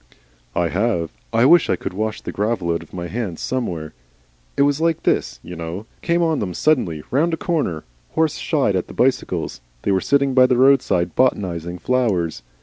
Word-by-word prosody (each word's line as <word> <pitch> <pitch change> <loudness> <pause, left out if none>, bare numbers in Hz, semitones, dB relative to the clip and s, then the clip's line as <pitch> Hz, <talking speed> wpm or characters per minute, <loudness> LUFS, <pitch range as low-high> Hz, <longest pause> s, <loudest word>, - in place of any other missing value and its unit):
"I 85 -1 +1
have. 90 -5 0 0.2
I 115 - +3
wish 170 +4 +6
I - - +3
could 90 - -6
wash 110 +2 -3
the - - -5
gravel 100 -4 -1
out 85 - -2
of - - -15
my 90 -1 -5
hands 100 -2 -4
somewhere. 90 -12 -3 0.6
It - - +5
was 145 +2 +1
like 165 0 +1
this, - - 0
you 90 - -8
know. 85 +5 -6 0.2
Came 170 0 +1
on 160 -3 +1
them 90 -4 -3
suddenly 90 - +1
round 160 +5 +2
a - - -17
corner. 145 - -1 0.3
Horse 160 -2 +2
shied - - +1
at - - -1
the - - -11
bicycles. 65 - 0 0.2
They - - +1
were 95 -1 +2
sitting 140 -1 +2
by 130 0 +6
the 125 -1 +2
roadside 120 -10 +3
botanising 90 -9 0
flowers. 95 -6 0
110 Hz, 190 wpm, -21 LUFS, 85-140 Hz, 0.6 s, wish